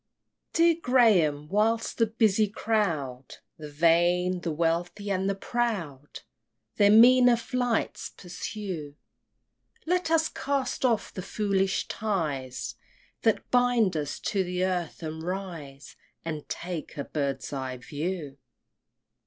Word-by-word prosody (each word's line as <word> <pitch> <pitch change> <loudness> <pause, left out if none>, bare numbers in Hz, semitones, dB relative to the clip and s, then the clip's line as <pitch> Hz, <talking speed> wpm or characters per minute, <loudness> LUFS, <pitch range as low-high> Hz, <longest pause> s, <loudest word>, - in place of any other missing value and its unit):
Dear 335 0 +4
Graham, 185 - +3
whilst 220 +7 0
the 230 - +4
busy 215 -1 +2
crowd, 165 - -2 0.2
The 150 -1 -7
vain, 175 +4 +2
the 170 - -2
wealthy, 170 +5 -1
and 190 0 0
the 195 - 0
proud, 195 - -3 0.6
Their 205 -1 +5
meaner 245 +3 +7
flights 240 0 -2
pursue, 180 -4 -6 0.9
Let 360 0 0
us 320 -1 +3
cast 275 -2 -2
off 230 -4 +1
the 185 - -5
foolish 195 -1 0
ties 150 - -3 0.5
That 225 -2 +1
bind 245 -6 +3
us 150 -2 -3
to 195 -2 0
the 180 0 -1
earth, 180 -3 -3
and 160 0 -5
rise 165 -6 -6 0.3
And 155 -3 -5
take 175 -4 -5
a 140 - -2
bird's 140 -2 -3
eye 130 -2 -4
view! 145 +2 -5
185 Hz, 120 wpm, -27 LUFS, 155-225 Hz, 0.9 s, meaner